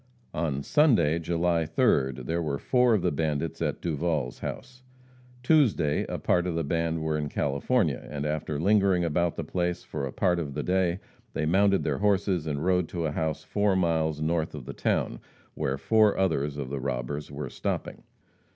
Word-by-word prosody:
On 75 -4 -1
Sunday, 85 - +3
July 85 0 +1
3rd, 65 -4 +1
there 85 +5 -1
were 75 -4 -1
four 125 - +3
of 100 - -1
the - - +2
bandits 75 +1 -2
at - - -1
Duval's 80 -5 -1
house. 130 0 -7 0.6
Tuesday 115 - +3
a - - -2
part 90 0 +1
of 85 - -2
the 85 - 0
band 80 +1 -1
were 80 -1 0
in 75 -1 -3
California, 75 - 0
and 75 -1 -4
after 75 -1 -2
lingering 95 -1 +3
about 85 +1 0
the 85 - -3
place 90 +2 -2
for 70 -3 -4
a - - -6
part 90 +2 +1
of 70 -4 -4
the 75 - -2
day, 90 -1 +1 0.3
they 80 - -1
mounted 95 +4 +3
their - - -1
horses 95 -5 +1
and 75 +1 -2
rode 90 -2 +2
to 85 -2 -3
a 75 - -1
house 80 0 -2
four 100 -1 +1
miles 80 -4 +1
north 80 0 -1
of 70 -5 -8
the - - -6
town, - - -1 0.3
where 70 -3 -2
four 105 +9 +3
others 75 -6 0
of 70 -2 -5
the 70 - -2
robbers 65 +3 -3
were 70 0 -5
stopping. - - -4
80 Hz, 185 wpm, -27 LUFS, 75-90 Hz, 0.6 s, Sunday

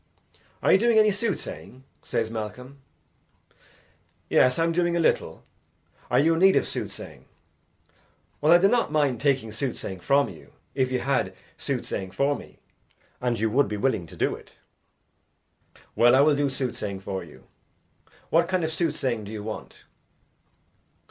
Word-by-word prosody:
"Are - - +4
you 190 - +6
doing 235 +1 +3
any 215 -1 +6
soothsaying?" 200 - -4 0.2
says 110 - -2
Malcolm. 125 +5 -7 1.5
"Yes, 125 0 +4
I 165 - +2
am 165 - +1
doing 170 0 +1
a - - +1
little. 165 - 0 0.7
Are - - +2
you 160 +4 +4
in 165 - 0
need 190 +1 +6
of - - +3
soothsaying?" - - -7 1.2
"Well, 150 +2 +4
I 175 - +9
do 190 +3 +4
not 235 -5 +1
mind 145 -6 +1
taking 135 -6 +1
soothsaying 110 -5 -4
from 140 +9 +2
you, - - -13 0.2
if 130 -2 0
you 130 - +1
had 135 0 0 0.2
soothsaying 95 - -4
for 140 +9 0
me, - - -12 0.6
and 120 -3 0
you 110 0 0
would 140 +4 +3
be 105 - -4
willing 105 -6 0
to - - -13
do - - +1
it." - - -12 1.4
"Well, 120 +2 +5
I 135 - +6
will 150 0 +4
do 145 0 +1
soothsaying 120 -7 -4
for 95 -1 -4
you. 80 - -15 0.9
What 165 +1 +4
kind 185 -2 0
of 160 - -1
soothsaying 130 - -1
do 100 - -8
you 105 -2 -6
want?" 110 0 -8
135 Hz, 160 wpm, -25 LUFS, 110-165 Hz, 1.5 s, I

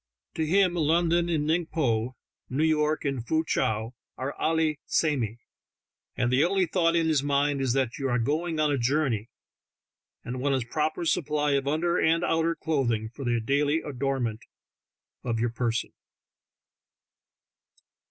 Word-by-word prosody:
To 160 - -1
him 185 +1 +3
London 170 +1 +2
and 155 -3 0
Ning 165 +2 +1
Po, 125 -6 -1 0.3
New 135 +5 0
York 155 -1 +1
and 135 -4 -1
Foo 160 +6 0
Chow, 110 -3 -1 0.2
are 135 +2 -3
"allee 160 -2 +1
samee," 125 -8 0 0.8
and 120 0 +1
the 135 +3 +4
only 190 +1 +2
thought 170 -1 +1
in 165 -1 +2
his 155 -4 +2
mind 140 0 +1
is 130 -3 +1
that 130 -2 -1
you 135 -1 -1
are 120 - +1
going 155 +7 -1
on 150 -1 +2
a 140 - 0
journey, 125 -4 0 0.9
and 125 +1 -5
want 140 0 +1
a 130 -3 -1
proper 155 +5 -1
supply 150 -2 +1
of 140 -1 0
under 170 +4 +1
and 165 +2 +2
outer 165 0 +1
clothing 120 -10 -1
for 135 +4 -9
the 120 -2 +1
daily 145 +7 +1
adornment 130 -5 -2 0.8
of 115 -2 -1
your 120 0 0
person. 115 -1 -2
145 Hz, 150 wpm, -27 LUFS, 125-160 Hz, 0.9 s, the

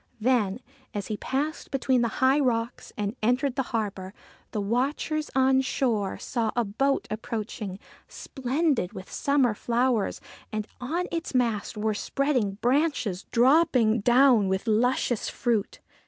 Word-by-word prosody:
Then, 225 -2 +1 0.3
as 205 0 -4
he - - -3
passed 290 +7 -3
between 260 -2 +1
the 235 - +2 0.2
high 270 +3 +5
rocks 235 -3 -1
and 210 +2 -2
entered 250 +4 +1
the 275 - +1
harbour, 200 -4 -3 0.3
the 215 - -3
watchers 275 +8 -1
on 265 0 +4
shore 230 -7 -1
saw 230 -3 -2
a 240 -1 +1
boat 270 +7 0
approaching, 215 -3 -4 0.3
splendid 265 - -1
with 185 -2 -9
summer 280 -5 +2
flowers, 235 0 0 0.3
and 215 -1 -2
on 325 +8 -2
its 335 -4 -4
mast 230 -4 0
were 215 +1 0
spreading 250 -2 0
branches 250 - +1
dropping 250 -3 +4
down 240 -1 +5
with 190 +2 -1
luscious 240 +1 +1
fruit. 230 -5 -1
240 Hz, 135 wpm, -26 LUFS, 215-270 Hz, 0.3 s, high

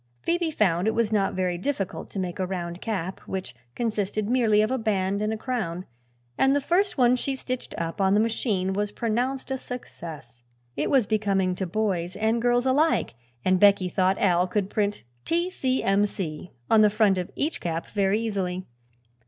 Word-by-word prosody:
Phoebe 345 -1 +1
found 190 - +1
it 220 - +1
was 230 -2 +1
not 200 -3 +1
very 180 -2 -1
difficult 200 -3 -3
to - - -8
make 180 -1 -3
a 185 - +1
round 175 -1 -4
cap, 190 -5 -3
which 190 -6 -4 0.2
consisted 215 -2 -1
merely 225 -3 +3
of 215 - -1
a 260 - 0
band 200 -2 0
and 215 +1 0
a 220 - -2
crown, 215 -8 -3 0.5
and 270 +1 +4
the - - +3
first 355 +7 +1
one 250 -1 +5
she 270 +2 -2
stitched 255 -1 -5
up 165 +3 -3
on 190 +1 +4
the - - +4
machine 210 -4 0
was 205 +1 -1
pronounced 245 +5 -2
a 265 - -1
success. 155 - -8 0.3
It 145 - -1
was 265 -5 +4
becoming 195 -3 +1
to 190 - -2
boys 185 -2 -1
and 220 +3 +1
girls 245 +1 +2
alike 290 - +2 0.3
and 185 0 +3
Becky 200 -2 +5
thought 185 +1 +2
Al 180 -2 +3
could 200 +1 -1
print 205 -1 -1 0.2
"T. 345 +2 0
C. 260 -7 0
M. 200 +1 +3
C." 175 -4 -5 0.2
on 220 -1 +5
the 210 - +6
front 205 -2 +3
of 180 - -4
each 305 +4 -1
cap, 165 -1 -2
very 200 0 +1
easily. 190 -5 -2
205 Hz, 190 wpm, -26 LUFS, 185-240 Hz, 0.5 s, the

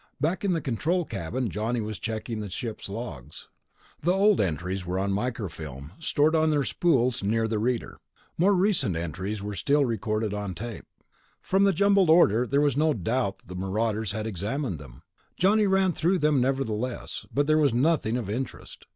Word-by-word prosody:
Back 170 +5 0
in 195 -3 +2
the 165 - -1
control 160 +8 0
cabin 100 - -3
Johnny 110 +5 -1
was 110 -1 -4
checking 110 0 -4
the 105 -1 -5
ship's 110 +3 -5
log. 85 - -7 0.7
The 170 - +2
old 200 +2 +4
entries 90 +1 -2
were 90 +1 -3
on 100 +1 0
microfilm, 80 - -4
stored 155 0 +2
on 160 0 +3
their 145 -2 +2
spools 130 -7 +1
near 110 +3 +1
the 110 -1 -1
reader. 120 +2 -2 0.4
More 195 +4 +3
recent 180 - +2
entries 90 +5 -4
were 105 0 -4
still 140 +8 +2
recorded 110 -2 -1
on 100 -3 -4
tape. 115 +4 -7 0.5
From 195 +1 +2
the 200 - +5
jumbled 200 -2 +3
order, 125 - +5
there 140 +3 +2
was 145 -3 +2
no 155 0 +2
doubt 110 +1 -1
that 90 +1 -8
marauders 105 +2 -1
had 110 +1 -3
examined 110 - -3
them. 65 -4 -13 0.3
Johnny 205 +3 +4
ran 190 -1 +3
through 175 +5 +1
them 150 -5 +2
nevertheless, 125 -2 -2
but 145 +1 +1
there 155 +1 +3
was 145 -3 +4
nothing 125 -2 +1
of 120 -6 -4
interest. 120 +6 -6
115 Hz, 175 wpm, -26 LUFS, 100-155 Hz, 0.7 s, the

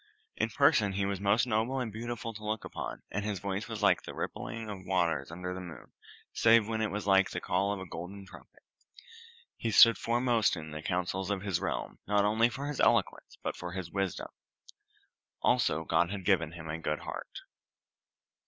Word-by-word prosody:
In - - 0
person 100 -2 +3
he 100 +1 0
was 100 -1 -2
most 105 +4 +3
noble 120 +3 0
and 115 -5 -3
beautiful 115 0 -5
to 105 0 -10
look 105 0 -2
upon, - - -6
and 105 - -2
his 105 -1 -2
voice 100 +2 -3
was - - -5
like - - +4
the - - -9
rippling 115 -1 -5
of 100 -3 -7
waters 85 -7 0
under 90 +1 -5
the 95 - -6
moon, 85 -6 -10 0.4
save 115 -1 +5
when 110 -1 -1
it 110 - +1
was 105 +1 -4
like 95 -1 +4
the - - -3
call 100 +1 0
of 100 - -3
a 95 - -6
golden 95 +4 -8
trumpet. - - -16 0.9
He 115 - -2
stood 115 0 +8
foremost 120 -2 +2
in 80 -2 -7
the 75 0 -6
counsels 90 +2 -2
of 100 -2 -1
his 95 -4 0
realm, - - -3
not 100 0 +3
only 110 +3 +3
for 135 +3 -5
his 145 -1 -4
eloquence, - - +2
but - - -2
for 90 0 -6
his 90 -3 -5
wisdom. 95 -3 -2 1.1
Also, 100 -11 +2
God 85 +2 +2
had 100 -2 -5
given 85 -5 +2
him 85 -2 -8
a 80 +1 -4
good 75 -1 -2
heart. - - -7
100 Hz, 195 wpm, -31 LUFS, 90-110 Hz, 1.1 s, stood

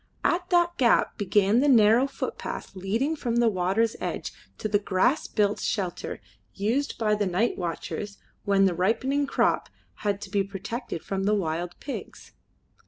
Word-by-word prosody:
At 355 +1 +1
that 345 -1 +2
gap 240 -3 +3
began 205 +2 +3
the 285 - +3
narrow 235 0 +5
footpath 270 - -5
leading 225 +12 -1
from 240 -6 -2
the 235 0 +4
water's 195 +4 +1
edge - - -4 0.2
to - - -2
the 205 -1 +2
grass 200 +8 +1
built 205 -1 +1
shelter 185 -5 -3 0.4
used 235 +8 -1
by 215 -2 +1
the 210 -1 +1
night 185 +7 +1
watchers 185 +4 -4 0.3
when 195 -1 +3
the 190 - +2
ripening 260 +10 +1
crop - - +1 0.3
had 200 -1 -1
to 200 -2 -8
be 200 -1 +2
protected 195 +1 -5
from 195 0 -2
the 210 +1 +3
wild 175 -2 -3
pigs. 280 - -7
210 Hz, 160 wpm, -26 LUFS, 195-240 Hz, 0.4 s, narrow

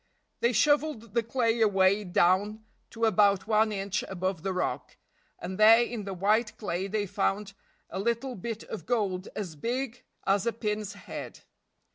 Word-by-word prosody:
They 235 - +2
shoveled 250 -2 +1
the 235 - +3
clay 230 0 0
away 200 -1 +4
down 200 +4 +2 0.2
to 230 0 -1
about 200 -2 +3
one 215 0 +3
inch 195 -1 -2
above 185 -2 -3
the 195 +2 -2
rock, 180 - -3 0.4
and 185 +3 -6
there 225 +2 +8
in 235 -4 -5
the 195 - -4
white 215 +5 +1
clay 190 -2 -3
they 205 +1 -1
found 200 +1 -1 0.3
a 190 - -5
little 235 +5 -1
bit 225 +1 -5
of 220 - -8
gold 200 -6 -1
as 185 -7 -5
big 245 - -3 0.2
as 195 +2 +2
a 235 - +1
pin's 210 -2 -3
head. 200 0 -8
210 Hz, 160 wpm, -28 LUFS, 195-230 Hz, 0.4 s, there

